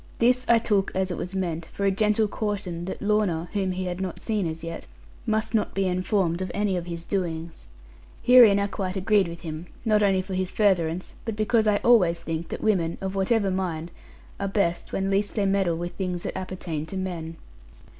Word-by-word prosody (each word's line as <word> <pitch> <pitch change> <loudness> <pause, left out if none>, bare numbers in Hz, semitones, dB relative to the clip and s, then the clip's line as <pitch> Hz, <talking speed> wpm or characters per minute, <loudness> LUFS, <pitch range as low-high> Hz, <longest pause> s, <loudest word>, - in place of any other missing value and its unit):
This 250 +2 +3
I 235 - +7
took, 205 -4 +1
as 190 0 0
it 175 - -3
was 185 +2 -5
meant, 170 -3 -2
for 200 - -3
a 195 - +4
gentle 215 +2 +2
caution 200 -5 -3
that 190 - -5
Lorna 205 -6 +1
(whom 190 -2 0
he 185 +1 -3
had 180 +1 -3
not 185 -3 -4
seen 210 -6 -1
as 160 0 -6
yet) 165 0 -6 0.4
must 220 +1 0
not 215 -2 0
be 195 0 +1
informed 185 -1 0
of 185 - -2
any 205 -2 +1
of 175 -1 -3
his 170 -1 -4
doings. 170 -4 -3 0.6
Herein 240 -5 +8
I 200 - +1
quite 190 -1 -3
agreed 200 -1 +3
with 170 0 -8
him; 160 +1 -6 0.2
not 215 -1 +3
only 195 -2 +3
for 190 0 -6
his 185 0 -1
furtherance, 185 -5 +1
but 225 -2 -3
because 215 +1 +2
I 210 -1 +4
always 180 -8 +4
think 165 0 -3
that - - -5
women, 175 -6 +1
of 190 0 -3
whatever 195 +1 +1
mind, 175 -3 -3 0.5
are 200 - -1
best 190 -4 -1
when 195 0 -1
least 200 +1 0
they 205 - +1
meddle 195 -4 +1
with 175 +1 -4
the - - -22
things 180 -2 -2
that - - -4
appertain 175 -4 -4
to 195 - -5
men. 170 -3 -4
190 Hz, 210 wpm, -25 LUFS, 175-205 Hz, 0.6 s, Herein